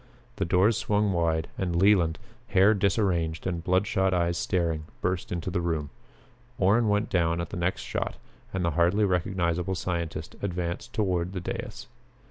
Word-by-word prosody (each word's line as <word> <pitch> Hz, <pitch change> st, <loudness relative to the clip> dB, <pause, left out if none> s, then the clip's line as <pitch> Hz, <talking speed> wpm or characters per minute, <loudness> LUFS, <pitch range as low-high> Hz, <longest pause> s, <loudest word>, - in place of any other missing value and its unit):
The -, -, 0 dB
doors 95 Hz, +6 st, +3 dB
swung 105 Hz, -1 st, +1 dB
wide 80 Hz, -2 st, +1 dB
and 90 Hz, -3 st, -1 dB
Leland, 90 Hz, -3 st, +4 dB, 0.3 s
hair 105 Hz, 0 st, +5 dB
disarranged 90 Hz, -5 st, 0 dB
and 85 Hz, -3 st, -2 dB
bloodshot 95 Hz, +1 st, +2 dB
eyes 85 Hz, -1 st, +1 dB
staring, 85 Hz, -4 st, -1 dB
burst 90 Hz, -1 st, -2 dB
into 85 Hz, +1 st, -3 dB
the 90 Hz, -1 st, 0 dB
room. 80 Hz, -4 st, -2 dB, 0.7 s
Orrin 105 Hz, +4 st, +3 dB
went 105 Hz, +1 st, +1 dB
down 85 Hz, -2 st, +2 dB
at 85 Hz, -, -4 dB
the -, -, -4 dB
next 85 Hz, +2 st, -1 dB
shot -, -, -3 dB, 0.4 s
and 95 Hz, -2 st, -1 dB
the 85 Hz, -, +1 dB
hardly 85 Hz, +6 st, +3 dB
recognizable 90 Hz, -1 st, 0 dB
scientist 85 Hz, -2 st, -3 dB
advanced 90 Hz, +4 st, -3 dB
toward 90 Hz, -4 st, 0 dB
the 95 Hz, -, -3 dB
dais. 90 Hz, -, -5 dB
90 Hz, 155 wpm, -27 LUFS, 85-95 Hz, 0.7 s, hair